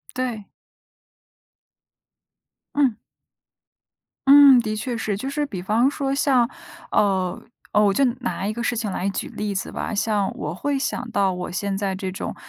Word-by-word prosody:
对。 245 -5 -3 2.3
嗯。 265 -6 +2 1.3
嗯， 275 -2 +9
的 215 -2 -3
确 235 +2 -3
是。 210 -3 -2
就 265 +6 -4
是 295 0 -1
比 185 -8 -6
方 230 +7 +2
说 275 -2 -2
像 260 -4 +3 0.4
呃 190 -3 +1 0.3
呃， 210 - +4
我 200 -1 +3
就 275 - +3 0.2
拿 235 -5 -3
一 - - -1
个 235 +1 -4
事 240 - 0
情 215 -3 -2
来 190 +1 -2
举 - - -4
例 210 -1 -4
子 190 - -3
吧。 - - -4
像 205 -1 0
我 150 +1 -4
会 285 +8 -1
想 250 -2 -2
到 195 -2 +2
我 180 0 -5
现 195 +1 -2
在 195 -2 -1
这 190 0 -4
种 190 - -5
215 Hz, 175 characters per minute, -23 LUFS, 195-255 Hz, 2.3 s, 嗯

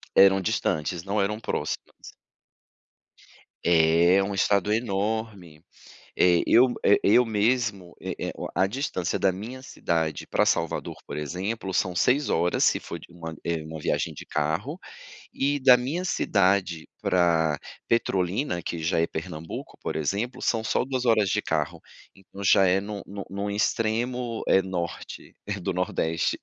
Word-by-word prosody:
Eram 95 0 +6
distantes, 85 -1 -1
não 100 +2 0
eram 105 +2 -1
próximas. 110 - -5 1.5
É 85 +3 +4
um 100 +1 -3
estado 100 +1 +2
enorme, 105 -6 -2 0.6
eh, 90 -1 +5
eu 125 +1 +5
eh, 100 - +6
eu 125 +5 +6
mesmo, 105 -4 0
é - - -4
é - - -3
o - - -5
a 95 - +2
distância 105 - -2
da 95 - +2
minha 115 +8 -7
cidade 80 -10 -2
para - - +2
Salvador, - - -1
por - - -6
exemplo, 95 +7 -4
são 90 -1 0
6 130 +10 +2
horas 85 +2 +2
se - - +2
for - - -7
de - - -14
uma 85 -2 -8
eh, 85 -2 -1
uma 80 0 -7
viagem - - -1
de - - -10
carro, 80 - -2 0.6
e 145 +1 0
da 130 -2 +7
minha 140 +9 -3
cidade 95 - +1
pra 80 -4 +2 0.3
Petrolina 95 -2 0
que 85 - -4
já 80 +1 0
é 85 - +2
Pernambuco 80 0 -7
por - - -3
exemplo 110 - -2
são 115 -2 0
só 115 - 0
2 130 -1 -2
horas 110 -4 +3
de - - 0
carro. - - -2 0.3
Então 95 +1 -11
já 95 0 +6
é 90 +1 +3
no 100 0 -6
no 100 0 -7
no 100 +1 -3
extremo, 115 +3 -1
eh, 95 - +4
norte, 90 -3 -6
eh, 105 0 -3
do 90 - -2
nordeste. 85 -2 -1
95 Hz, 155 wpm, -26 LUFS, 85-115 Hz, 1.5 s, da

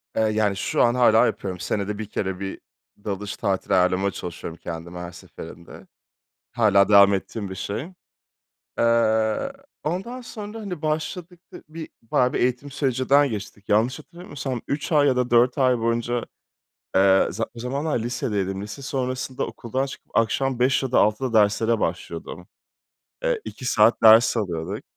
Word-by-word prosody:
Eee, - - +2
yani, 105 -2 +1
şu 95 - +1
an 120 +1 +3
hâlâ 115 -3 +5
yapıyorum. 95 -2 -3
Senede 100 +3 -2
1 110 - -4
kere 95 -2 -3
bir 95 -1 -5 0.4
dalış 100 0 -4
tatili 100 -3 -1
ayarlamaya 95 +1 +2
çalışıyorum 85 -2 -7
kendime 85 +1 -6
her 90 0 -7
seferinde. 85 0 -12 0.6
Hâlâ 100 -3 +4
devam 100 -1 +7
ettiğim 100 +1 -4
bir 95 - -6
şey. 110 - -4 0.9
Eee, 115 - +2 0.3
ondan 195 +11 -3
sonra, 215 -2 -8
hani, 180 -6 -6
başladık, 165 +3 -3
dı - - -10
bir 160 0 -8
bayağı 125 +2 +1
bir - - -1
eğitim 125 +3 -1
sürecinden 140 +1 +2
geçtik. 100 -1 -7
Yanlış 115 +7 +2
hatırlamıyorsam 145 -6 -6
3 140 +2 -3
ay 145 -1 +5
ya 130 - +2
da 125 -1 0
4 120 +2 +4
ay 130 -2 +3
boyunca, 115 +1 -1 0.7
eee, 95 0 +5
za 115 +6 -2
o - - -11
zamanlar 140 +3 -1
lisedeydim, 105 -5 -2
lise 105 +7 -8
sonrasında 130 -1 -3
okuldan 130 +3 -3
çıkıp 135 - -11
akşam 125 +3 +1
5 130 +2 +2
ya 130 -2 -3
da - - +4
6'da 110 +4 +1
derslere 110 +2 +3
başlıyordum. 85 +2 -4 0.8
Eee, - - 0
2 125 - -8
saat 115 -1 +4
ders 115 +2 +7
alıyorduk. 90 0 -3
115 Hz, 155 wpm, -23 LUFS, 100-135 Hz, 0.9 s, devam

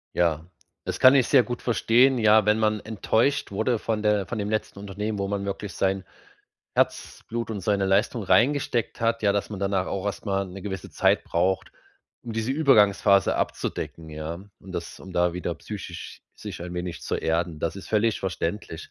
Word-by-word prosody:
Ja, 85 -1 +1 0.4
das - - -3
kann 130 +1 +8
ich 130 -3 +4
sehr 130 -4 +5
gut 120 +2 -5
verstehen. 125 +2 +3
Ja, 110 -1 +5
wenn 105 +1 +3
man 110 -1 +1
enttäuscht 110 +6 0
wurde 110 +4 0
von 110 -1 -2
der 105 -2 +2
von 115 - -5
dem 105 0 -2
letzten 110 -2 -2
Unternehmen, 105 +1 -4
wo 100 - -1
man 100 0 -2
wirklich 100 0 -5
sein 95 -1 0 0.7
Herzblut 115 0 -1
und 105 -3 -4
seine 100 0 +1
Leistung 105 +4 +1
reingesteckt 125 +5 +2
hat, 115 0 +1
ja, 100 - +4
dass 100 0 -1
man 100 -2 -6
danach 95 -1 0
auch 100 +1 -3
erst 100 - -4
mal 100 -1 0
'ne 95 +1 -9
gewisse 95 -3 -6
Zeit - - +2
braucht, 95 +3 0 0.5
um 120 - -6
diese 110 +2 -2
Übergangsphase 105 -9 +4
abzudecken, 80 -1 -3
ja? 75 +2 -5 0.3
Um - - -11
das - - -6
um 95 -1 -10
da 90 0 +2
wieder 90 -1 -3
psychisch 85 -2 -8
sich - - -8
ein 90 0 -6
wenig 90 -1 -4
zu - - -2
erden. 80 -1 -1
Das 85 - -2
ist 100 - -9
völlig 110 +1 +2
verständlich, 85 -1 -4
100 Hz, 185 wpm, -25 LUFS, 95-110 Hz, 0.7 s, kann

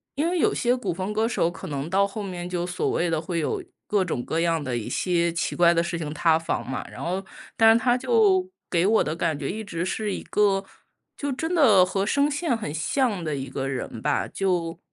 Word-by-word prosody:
因 310 +4 +1
为 355 0 0
有 - - +3
些 245 +1 +2
古 200 -9 -2
风 190 +3 -3
歌 220 +1 +1
手 170 -7 +1
可 170 - -9
能 145 +1 -4
到 195 +2 +3
后 210 +1 -6
面 180 -2 -5
就 175 -1 -2
所 180 0 -1
谓 175 0 0
的 160 -1 0
会 170 0 -2
有 380 - -2 0.2
各 205 -2 +2
种 130 -8 -2
各 165 +5 -1
样 165 -2 +1
的 130 -3 -2
一 115 - -5
些 170 -2 +1
奇 170 - -2
怪 170 -1 +5
的 170 0 +2
事 170 0 -3
情 150 -2 -4
塌 160 0 +3
房 165 - -3
嘛， 130 - -3
然 - - -8
后 185 +3 -2 0.3
但 225 0 +7
是 230 - +3
他 245 +1 +3
就 390 - +3 0.2
给 170 +1 +2
我 220 +1 +4
的 155 - -3
感 165 -3 -1
觉 140 -1 -4
一 220 +3 -4
直 175 -4 -3
是 205 +2 -2
一 - - -5
个， 195 -2 +1 0.5
就 285 -1 -2
真 320 +7 -2
的 215 - +6
和 195 +1 -1
声 280 +6 +2
线 295 -3 0
很 210 -10 -5
像 200 - 0
的 155 -2 -2
一 135 -1 -5
个 135 0 -3
人 125 -4 -4
吧， 145 +3 0
就 175 -3 -1
180 Hz, 255 characters per minute, -25 LUFS, 165-225 Hz, 0.5 s, 但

